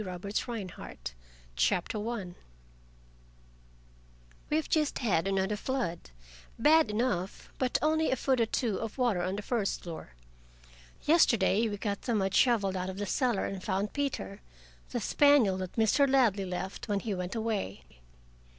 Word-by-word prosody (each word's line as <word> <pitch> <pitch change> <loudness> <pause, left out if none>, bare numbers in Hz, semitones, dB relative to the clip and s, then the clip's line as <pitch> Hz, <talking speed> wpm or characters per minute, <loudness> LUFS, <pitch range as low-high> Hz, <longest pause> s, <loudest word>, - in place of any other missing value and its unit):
LEONE - - -6
BRACKER 200 +3 -7
1913 185 - -7 0.4
CHAPTER 180 - 0
I 200 -7 -4 2.2
We 300 - +2
have 315 - -1
just 305 -2 +1
had 195 -8 +1
another 195 +1 +1
flood, 210 - -3 0.5
bad 310 +5 +5
enough, 210 -4 -2
but 255 -2 +1
only 315 +1 +2
a - - +2
foot 260 -1 +1
or 225 - +2
two 225 -3 -1
of 225 +1 -5
water 240 -8 +1
on 185 +2 -1
the 205 - -5
first 220 -4 -1
floor. 165 - -8 0.9
Yesterday 230 - +4
we 205 - -4
got 200 0 -3
the 235 - -1
mud 195 -2 0
shoveled 205 -7 +3
out 185 0 -2
of 190 - -6
the 205 - -2
cellar 240 0 +1
and 195 -1 -5
found 200 +1 -1
Peter, 265 - -3 0.5
the - - -2
spaniel 285 -10 +4
that 185 -1 -5
Mr. 240 +6 +3
Ladley 230 -8 +3
left 185 +1 -5
when 205 -2 0
he 215 - -2
"went 180 +2 -4
away". 220 - -2
210 Hz, 155 wpm, -30 LUFS, 190-245 Hz, 2.2 s, bad